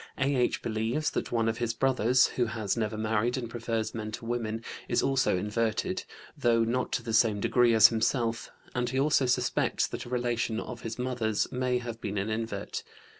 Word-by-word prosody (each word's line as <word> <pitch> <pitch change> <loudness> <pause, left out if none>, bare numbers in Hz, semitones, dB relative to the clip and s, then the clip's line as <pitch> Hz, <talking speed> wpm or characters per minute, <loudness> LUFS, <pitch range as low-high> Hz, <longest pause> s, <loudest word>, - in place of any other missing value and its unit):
A.H. 130 -2 +1
believes 115 +7 -1
that - - -3
one 115 -1 +1
of 115 +1 -1
his 120 -1 -1
brothers, 130 0 +3
who 125 - 0
has 110 -3 -2
never 110 -2 -2
married 110 +3 0
and 120 -2 -3
prefers 115 -1 -2
men 110 -1 -4
to 115 - -6
women, 115 -1 -2 0.3
is 120 - +2
also 135 -8 +2
inverted, 110 - -1 0.3
though 120 -5 +3
not 120 +2 -1
to 125 - -1
the 115 -1 -4
same 110 -2 +4
degree 120 +2 +3
as 110 0 +9
himself, 115 0 0 0.2
and 125 0 -1
he 130 +2 -1
also 140 -2 +3
suspects 125 - +1
that - - -6
a - - -9
relation 120 -2 -1
of 120 0 -7
his 115 0 -5
mother's 120 -4 -1
may 125 -1 0
have 120 -2 -6
been 100 -1 -3
an 100 +3 -1
invert. 110 -2 -3
115 Hz, 190 wpm, -29 LUFS, 110-125 Hz, 0.3 s, as